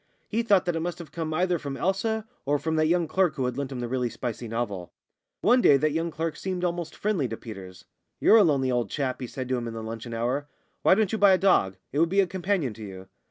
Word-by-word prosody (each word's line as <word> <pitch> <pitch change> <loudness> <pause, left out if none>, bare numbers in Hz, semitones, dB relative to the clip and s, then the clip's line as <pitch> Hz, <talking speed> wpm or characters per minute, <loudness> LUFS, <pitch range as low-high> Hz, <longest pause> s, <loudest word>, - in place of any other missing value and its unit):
He 225 +2 0
thought 200 -5 +3
that 175 -2 0
it - - 0
must 175 +1 -3
have 170 -3 -10
come 160 -2 -4
either 175 +2 +1
from 140 -2 -5
Elsa 220 +4 -1 0.2
or 145 +1 +1
from 160 +2 -2
that 155 0 +3
young 170 0 +2
clerk 175 -1 +1
who 135 -3 -1
had 125 -1 -2
lent 140 0 -3
him 125 -2 -4
the 120 - -2
really 125 0 -1
spicy 120 0 -5
novel. 105 -7 -3 0.5
One 245 +3 +5
day 140 - +6
that 155 +3 +1
young 165 +2 -1
clerk 165 0 -3
seemed 185 -2 -3
almost 175 -2 -2
friendly 195 -10 0
to 115 -1 -5
Peters. 95 -5 -10 0.3
"You're 225 - +6
a 215 - +7
lonely 135 -6 +2
old 120 -1 0
chap," 135 -4 -2
he 125 - -3
said 130 +1 -5
to 130 - +1
him 120 -1 -4
in 115 - -6
the 110 - -5
luncheon 115 +1 -6
hour. 125 +5 -1 0.3
"Why - - +5
don't 215 -2 +1
you 220 - -1
buy 200 -1 +7
a - - +5
dog? 180 - +3 0.2
It 145 - -1
would 165 +1 +4
be 195 +3 +2
a 195 - +5
companion 180 - -1
to 110 +1 -10
you." 95 -2 -9
150 Hz, 265 wpm, -26 LUFS, 120-180 Hz, 0.5 s, a